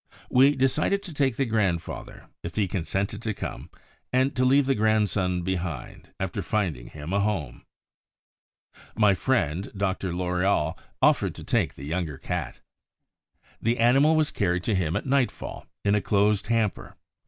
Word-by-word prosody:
We 135 +3 +6
decided 150 +9 +1
to 180 -5 -8
take 135 -4 +1
the 135 - +1
grandfather, 100 -8 -2 0.2
if 85 - -7
he 105 -3 +1
consented 95 +3 -2
to 110 -3 -2
come, - - -6 0.4
and 130 +2 +2
to 130 - +1
leave 135 +2 +4
the 135 - +2
grandson 105 -5 +1
behind, 90 -6 -4
after - - -2
finding 90 - -2
him 75 +4 -7
a 100 - +3
home. 95 - -2 1.3
My 105 -2 +5
friend 95 - 0
Dr. 95 -1 -1
Loriol 90 -2 0 0.3
offered - - +3
to - - -9
take - - 0
the 70 - -9
younger 80 -2 -3
cat. - - -4 1.0
The 115 +2 +1
animal 135 +7 +5
was 155 -1 +2
carried 90 -3 0
to 110 - 0
him 85 -4 0
at - - -2
nightfall 135 -2 -1 0.2
in 100 - +4
a 105 - +2
closed 105 0 +2
hamper. 115 -4 -1
100 Hz, 155 wpm, -26 LUFS, 90-125 Hz, 1.3 s, We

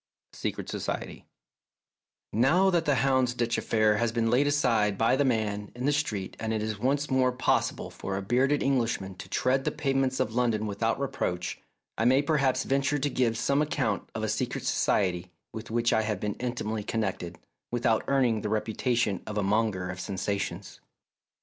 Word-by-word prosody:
A - - -15
SECRET - - -4
SOCIETY - - -5 1.1
Now 160 - +4
that 170 -2 +1
the 145 - +3
Houndsditch 125 -3 +1
affair 110 -2 +2
has 115 0 +1
been 115 -1 0
laid 135 +4 +3
aside 115 -8 +2
by 115 +4 +3
the 145 - +2
man 105 -5 -1
in 125 +1 -4
the 145 - +3
street 115 -10 -2
and 110 0 -2
it 110 -1 -1
is 110 -1 -3
once 140 +4 0
more 130 -1 +3
possible 125 +1 0
for 95 0 -4
a 100 - -4
bearded 130 +7 +2
English 125 -4 +1
man 95 0 -7
to - - -9
tread 130 +1 +1
the - - +1
pavements 135 -2 0
of 110 - 0
London 115 -3 +1
without 110 +4 -1
reproach, 90 -10 -3 0.4
I 115 - +2
may 130 +3 +4
perhaps 140 -4 +2
venture 140 +2 +1
to 145 +1 0
give 115 -3 +1
some 140 +5 +2
account 150 -2 -1
of - - -3
a - - 0
secret - - -2
society 90 -2 +1 0.2
with 110 0 -7
which 115 +1 +1
I 110 - +3
have 105 -3 -2
been 105 0 -2
intimately 120 -3 -2
connected, 95 -5 -3 0.3
without 120 -2 +1
earning 125 -6 +2
the 105 - -3
reputation 110 -1 0
of 105 - -4
a 105 - +1
monger 100 -3 0
of 90 - -8
sensations. 100 +1 -4
115 Hz, 180 wpm, -28 LUFS, 105-135 Hz, 1.1 s, Now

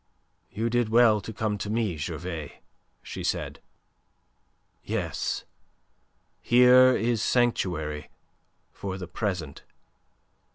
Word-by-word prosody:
"You 115 +4 -2
did 120 -2 +1
well 115 -2 +5
to 110 - -7
come 105 -1 -2
to 100 - -4
me, 110 -5 0
Gervais," 80 0 -6 0.4
she - - -7
said. - - -3 1.2
"Yes, - - -3 1.0
here 125 +1 +6
is 115 -1 0
sanctuary 85 - 0 0.6
for 95 -1 -6
the 90 -2 -7
present. 90 -6 -4
105 Hz, 95 wpm, -27 LUFS, 85-120 Hz, 1.2 s, here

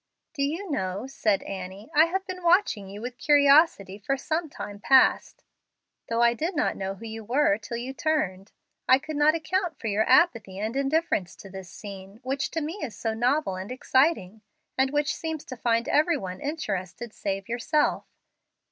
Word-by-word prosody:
"Do 295 - -4
you 325 +6 -2
know," 190 -3 -2
said 220 -7 0
Annie, 195 - -7
"I 310 +2 +6
have 380 +3 -2
been 370 -1 -6
watching 340 - +2
you 205 +2 -8
with 245 0 -6
curiosity 285 - +4
for 275 +7 -1
some 315 +4 -2
time 205 -6 -8
past, 265 +5 +3 0.7
though 230 +1 +2
I 235 0 +5
did 325 - -3
not 300 - +1
know 195 0 -4
who 230 - -11
you 225 0 -7
were 235 -2 +2
till 230 +2 -6
you 250 +3 -5
turned. 225 - -1 0.4
I 260 - +8
could 310 +3 -7
not 295 +2 +4
account 350 0 -2
for - - -11
your 210 +2 +1
apathy 225 - +3
and 215 +4 -3
indifference 275 - 0
to 195 - -12
this 190 -2 -9
scene, 195 0 -10
which 270 +1 -2
to 325 - -3
me 320 +7 -5
is 235 -8 -5
so 225 -1 -2
novel 245 -1 +1
and 190 +5 -6
exciting, 255 - +1 0.3
and 265 0 +2
which 295 +1 0
seems 320 -2 -5
to 255 - -7
find 230 -1 0
every 310 +2 +3
one 185 -6 -7
interested 220 - -4
save 195 -1 -4
yourself. 245 +6 0
250 Hz, 185 wpm, -26 LUFS, 205-305 Hz, 0.7 s, I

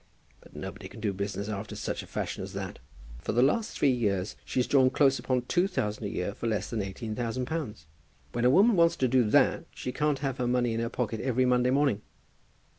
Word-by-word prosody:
But - - -19
nobody 95 +1 -7
can 115 - -11
do 105 -2 -1
business 100 +1 -3
after 105 0 -5
such - - -3
a - - -12
fashion - - -4
as - - -7
that. - - -5 0.4
For 75 - -3
the 120 +3 +4
last 215 +12 +1
three 140 - +4
years 100 -6 0
she's 125 - 0
drawn 130 -2 +4
close 135 0 +3
upon 125 -2 0
two 175 +8 +2
thousand 105 - -2
a - - -2
year 90 +2 -3
for 115 - -4
less 105 -3 -1
than 115 -3 -1
eighteen 100 +3 -5
thousand 120 +1 -2
pounds. 130 - -4 0.5
When 120 - -2
a 125 - +6
woman 200 - +5
wants 170 -1 +4
to 130 - +1
do 125 0 +4
that, - - +3
she 125 - -4
can't 150 +1 +1
have 135 -2 -2
her 125 - 0
money 120 -1 +1
in 115 - -1
her 115 0 -1
pocket 115 -3 -2
every 130 0 +1
Monday 125 0 +3
morning." 135 -6 +2
120 Hz, 225 wpm, -29 LUFS, 105-130 Hz, 0.5 s, a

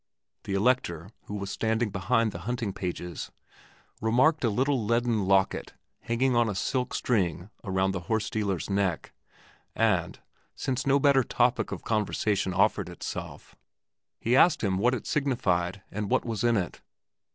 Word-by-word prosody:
The 100 - -2
Elector, 100 -6 0
who 105 - -6
was 100 -1 -4
standing 110 0 0
behind 115 +3 +1
the 85 - -7
hunting 120 -5 -2
pages, 90 -3 -5 0.7
remarked 130 +8 +3
a 120 - +3
little 130 +3 +1
leaden 115 -1 +1
locket 95 0 +1 0.3
hanging 125 +2 0
on 120 -1 +3
a 105 - -3
silk 125 +5 -1
string 95 -4 0
around 95 -2 0
the 95 - -3
horse 110 -1 +1
dealer's 100 -5 -2
neck, 100 -4 -1 0.6
and, - - +1 0.4
since 135 0 -2
no 140 +1 +4
better 140 -2 +4
topic 120 +1 +1
of - - -5
conversation 105 -2 0
offered 100 0 +2
itself, 85 - -7 0.6
he 120 +3 +1
asked 155 +2 +5
him 95 -2 +1
what 125 +5 +3
it 120 - -6
signified 100 -10 0
and 105 0 -3
what - - +1
was 115 -1 -3
in 120 -1 +3
it. 90 -3 -3
110 Hz, 150 wpm, -28 LUFS, 95-125 Hz, 0.7 s, asked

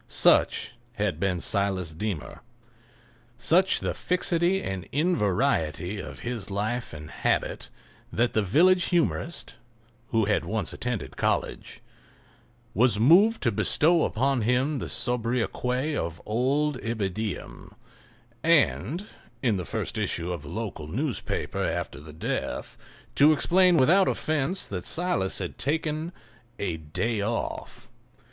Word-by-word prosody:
Such - - +3 0.2
had 105 -4 -1
been 95 -3 0
Silas 95 -3 0
Deemer—such 120 - -3
the - - -1
fixity 180 +1 +1
and 95 -3 -5
invariety 105 - 0
of - - -8
his 120 -5 -4
life 110 +5 -2
and 75 -1 -9
habit, - - -1 0.4
that 120 +1 +1
the 110 - +2
village 170 - +4
humorist 170 -1 -1 0.5
(who 110 -2 +2
had 105 0 +1
once 110 -2 -3
attended 125 -4 -4
college) - - -2 0.9
was 115 0 +3
moved 190 - +5
to 120 - +3
bestow 160 - +3
upon 130 +2 +1
him 130 +6 +1
the - - -5
sobriquet 125 +3 -1
of 85 - -3
"Old 135 +5 0
Ibidem," 110 -2 -4 0.7
and, 120 - +2 0.4
in 115 -6 +2
the 90 - -4
first - - -3
issue 85 +1 -1
of 85 - -5
the 70 - -10
local 105 -9 -5
newspaper 130 - -2
after 70 - -3
the 75 +1 -11
death, 80 - -4 0.4
to 145 +2 +6
explain 180 +3 +4
without 180 +8 +5
offence 155 +4 -1
that 90 -3 -5
Silas 160 - 0
had 90 -3 -5
taken 155 +2 -1 0.5
"a 90 -5 -2
day 95 +9 -2
off." 115 +3 -4
120 Hz, 120 wpm, -26 LUFS, 95-150 Hz, 0.9 s, to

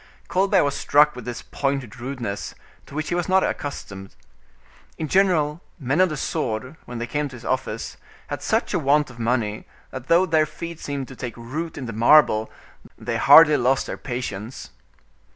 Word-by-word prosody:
Colbert 195 +1 +3
was 140 -1 0
struck 150 +1 +4
with 125 -3 -9
this 120 -1 -6
pointed 135 -4 -3
rudeness, 120 -5 -5 0.3
to 140 - -12
which 155 0 -3
he - - -1
was 175 +1 -1
not 190 0 +4
accustomed. 100 -9 -5 0.8
In 160 - -3
general, 170 -4 +2 0.2
men 140 +5 +1
of 185 - +4
the 155 - -4
sword, 125 +1 -3
when 120 - -7
they 120 - -3
came 145 +4 -2
to 130 - -11
his 120 - -12
office, 130 -4 -3 0.3
had - - -5
such - - 0
a - - +2
want 145 0 +2
of 120 - -15
money, 115 -3 -1 0.2
that 130 -1 -8
though 170 +3 +5
their 160 -3 +2
feet 170 +1 -8
seemed 140 -2 -4
to 130 - -10
take 125 -2 -6
root 155 +8 -5
in 135 - -5
the 115 - -5
marble, 110 -1 +5 0.5
they - - -3
hardly 155 -2 +8
lost 130 +1 +1
their - - -5
patience. 120 -2 -6
135 Hz, 185 wpm, -23 LUFS, 120-155 Hz, 0.8 s, hardly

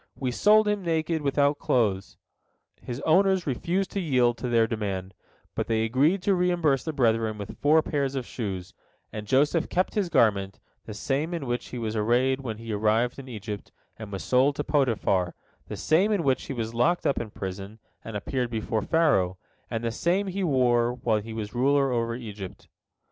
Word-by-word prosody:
We 130 -2 -2
sold 210 - +4
him 210 -1 0
naked, 165 -2 -1
without 145 +1 +2
clothes." 100 -6 0 0.6
His 125 +2 -6
owners 190 +3 +3
refused 170 +8 -1
to 200 - -2
yield 125 -8 +2
to 125 - -3
their 115 -1 +4
demand, 100 -4 -4 0.4
but - - -2
they 110 -1 +1
agreed 145 - +2
to 200 - +3
reimburse 175 -7 +2
the 160 - -2
brethren 115 -6 +1
with 100 -1 -8
four 155 +2 +4
pairs 140 -3 -1
of 130 -2 -3
shoes, 95 -8 -5 0.4
and 105 -1 -6
Joseph 150 - +2
kept 185 +1 0
his 200 -4 0
garment, 100 -8 +2 0.3
the 105 - -6
same 145 +9 -1
in 160 -5 -4
which 120 -1 -3
he 125 - -7
was 115 -2 -3
arrayed 125 +5 +2
when 115 -5 -5
he 115 -1 -6
arrived 110 +5 +1
in 135 - -9
Egypt 105 -3 -7 0.2
and 110 -2 -9
was 95 - -5
sold 130 +3 +3
to 145 - -2
Potiphar, 110 - +1 0.3
the - - -6
same 180 +7 +2
in 200 -5 +1
which 135 -3 +1
he - - -5
was 115 -2 -4
locked 165 +10 +1
up 140 - +1
in 115 - -6
prison 95 +2 -7 0.3
and 110 -2 -5
appeared 125 +3 -2
before 110 -1 -2
Pharaoh, 120 - +2 0.3
and 115 0 -3
the 115 - -1
same 175 - 0
he 195 0 -3
wore 125 -6 +2
when 110 -4 0
he 110 +2 -8
was 105 -2 -5
ruler 135 +2 +2
over 115 -1 -1
Egypt. 105 -6 -8
125 Hz, 190 wpm, -26 LUFS, 110-155 Hz, 0.6 s, sold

